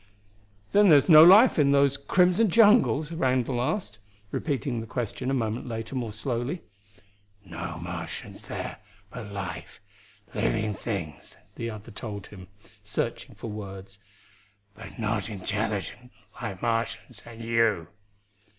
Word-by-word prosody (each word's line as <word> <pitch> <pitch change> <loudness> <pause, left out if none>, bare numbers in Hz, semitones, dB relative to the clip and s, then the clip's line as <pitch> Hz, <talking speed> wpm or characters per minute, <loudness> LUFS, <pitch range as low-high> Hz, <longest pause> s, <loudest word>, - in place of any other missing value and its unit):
"Then 205 -1 +5
there's 145 -4 +6
no 155 -2 +10
life 200 +5 +8
in 140 -1 +4
those 140 -1 +4
crimson 180 +9 +3
jungles?" 205 -7 +4
Randall 130 -5 0
asked, 125 - -2 0.3
repeating 135 -4 -2
the 115 - -7
question 125 +3 -3
a - - 0
moment 115 0 -2
later 115 +1 -5
more 120 -4 -3
slowly. 120 - -3 0.8
"No 85 -1 -6
Martians 85 +1 -7
there, - - -5 0.3
but 100 - -8
life 95 -4 -6 0.5
living 110 0 0
things," 95 -9 -6 0.2
the 115 0 -4
other 110 +1 -9
told 105 -2 -7
him, 95 -3 -12 0.4
searching - - -4
for 115 - -7
words. 100 -1 -8 0.7
"But 115 +2 -12
not 105 -2 -1
intelligent, 105 +4 -3 0.3
like 95 -2 -5
Martians 115 0 -2
and 115 -1 -10
you." 115 -7 +1
115 Hz, 125 wpm, -27 LUFS, 105-140 Hz, 0.8 s, no